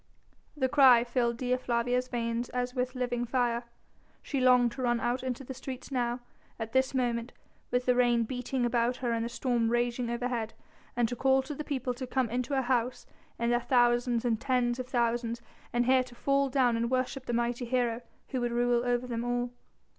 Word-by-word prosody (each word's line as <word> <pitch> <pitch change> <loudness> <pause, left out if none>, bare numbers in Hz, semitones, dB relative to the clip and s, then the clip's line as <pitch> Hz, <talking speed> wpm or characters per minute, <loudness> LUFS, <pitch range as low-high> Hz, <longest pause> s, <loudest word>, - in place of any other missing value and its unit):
The 260 -2 +2
cry 255 -3 +6
filled 240 -1 0
Dea 250 0 0
Flavia's 250 0 0
veins 235 -1 -2
as 250 0 -2
with 255 0 -2
living 245 -1 -1
fire. 240 -1 0 0.6
She 280 - -2
longed 250 -2 +5
to 240 - -7
run 240 -1 +1
out 240 +2 -1
into 260 0 -4
the 265 - -7
streets 260 +1 -8
now, 245 -1 -1 0.4
at 225 -1 -5
this 260 +1 +2
moment, 240 -2 -1 0.4
with 250 0 0
the 250 - +4
rain 240 -1 +3
beating 250 +1 -2
about 240 0 +1
her 245 -1 -2
and 230 -1 0
the 235 - -3
storm 240 -1 0
raging 240 0 0
overhead, 235 -2 -2 0.4
and 240 -1 +2
to 245 - -4
call 265 +1 +3
to 290 +3 -6
the 300 - -5
people 260 -4 -2
to 255 +1 -6
come 250 -3 0
into 250 +3 -1
her 265 - +1
house, 245 0 0 0.3
in 235 0 0
their 240 0 +2
thousands 240 -1 +2
and 225 -2 0
tens 250 -2 +1
of 255 - -4
thousands, 235 -1 0 0.3
and 240 0 +1
here 260 +1 +5
to 245 -1 -14
fall 275 +2 +1
down 255 -3 +3
and 230 +1 0
worship 255 +1 -1
the - - -1
mighty 240 +1 -1
hero 240 -1 0 0.3
who 255 - -2
would 240 0 -1
rule 240 0 +2
over 245 0 0
them 235 -1 -3
all. 245 0 -1
245 Hz, 200 wpm, -30 LUFS, 235-255 Hz, 0.6 s, cry